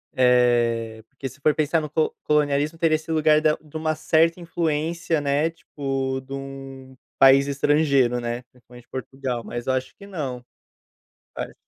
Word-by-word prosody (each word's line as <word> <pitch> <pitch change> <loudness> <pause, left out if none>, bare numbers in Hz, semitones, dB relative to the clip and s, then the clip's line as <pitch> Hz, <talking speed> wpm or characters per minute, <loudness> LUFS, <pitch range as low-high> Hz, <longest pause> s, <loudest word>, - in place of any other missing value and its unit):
eh, 120 -3 +2
porque 135 0 -7
se 140 - -17
for 155 0 +4
pensar 155 +1 +1
no 150 - -5
co 155 +1 0
colonialismo 150 +1 +1
teria 160 -2 +3
esse 160 +1 -5
lugar 155 -1 +4
da 155 -1 +3
de 155 0 -20
uma 155 0 0
certa 165 +2 +2
influência, 165 -1 -1
né, 145 +3 +1
tipo 135 -4 -3
de 135 +1 -10
um 135 -1 -8 0.2
país 135 +1 +7
estrangeiro 140 -3 +2
né, 120 +1 -3
principalmente 125 0 -17
Portugal, 130 -2 -4
mas 120 +1 -6
acho 130 0 -1
que 200 - -12
não, 135 -10 -5 0.9
parece - - -6
140 Hz, 155 wpm, -23 LUFS, 130-155 Hz, 0.9 s, país